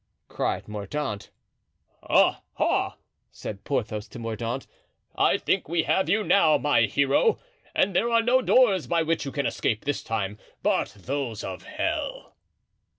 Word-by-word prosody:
cried -, -, -2 dB
Mordaunt. 105 Hz, +2 st, -4 dB, 0.7 s
"Ah! -, -, +3 dB, 0.2 s
ah!" -, -, +1 dB, 0.3 s
said 100 Hz, -2 st, -8 dB
Porthos 110 Hz, -6 st, -2 dB
to -, -, -11 dB
Mordaunt, 115 Hz, +2 st, -4 dB, 0.5 s
"I -, -, +3 dB
think -, -, -1 dB
we 165 Hz, -1 st, +1 dB
have 190 Hz, -4 st, +1 dB
you 215 Hz, +4 st, +2 dB
now, 155 Hz, -7 st, +5 dB
my 140 Hz, -6 st, +3 dB
hero! 140 Hz, -, +3 dB, 0.4 s
and 190 Hz, -1 st, +2 dB
there 235 Hz, -, +2 dB
are 230 Hz, -1 st, +3 dB
no 255 Hz, +2 st, +4 dB
doors 225 Hz, -9 st, +4 dB
by 170 Hz, -1 st, +2 dB
which 165 Hz, -1 st, 0 dB
you 135 Hz, -, -4 dB
can 140 Hz, -1 st, -2 dB
escape 110 Hz, -2 st, -1 dB
this 145 Hz, 0 st, -1 dB
time 105 Hz, -2 st, -3 dB, 0.2 s
but -, -, +1 dB
those 125 Hz, 0 st, -3 dB
of 95 Hz, -1 st, -6 dB
hell." -, -, -3 dB
140 Hz, 150 wpm, -26 LUFS, 110-170 Hz, 0.7 s, now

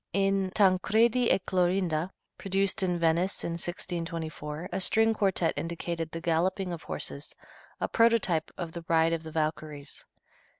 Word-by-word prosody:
In 195 Hz, 0 st, +2 dB
"Tancredi 220 Hz, +5 st, +3 dB
e -, -, +5 dB
Clorinda," 180 Hz, -3 st, 0 dB, 0.3 s
produced 195 Hz, +2 st, +1 dB
in 180 Hz, -2 st, +1 dB
Venice, 170 Hz, +3 st, +1 dB
in -, -, -2 dB
1624, 165 Hz, -2 st, -4 dB
a 190 Hz, +2 st, -1 dB
string 225 Hz, +4 st, +4 dB
quartet 190 Hz, -5 st, +1 dB
indicated 165 Hz, -1 st, -3 dB
the 165 Hz, -, -5 dB
galloping 175 Hz, +3 st, 0 dB
of 165 Hz, -, -6 dB
horses, 140 Hz, -1 st, -4 dB, 0.4 s
a -, -, 0 dB
prototype 230 Hz, -9 st, +2 dB
of 170 Hz, -3 st, -4 dB
the 170 Hz, 0 st, -7 dB
"Ride 165 Hz, 0 st, +3 dB
of 165 Hz, -, -1 dB
the 160 Hz, -, -8 dB
Valkyries." 155 Hz, -2 st, -3 dB
175 Hz, 140 wpm, -29 LUFS, 165-195 Hz, 0.4 s, e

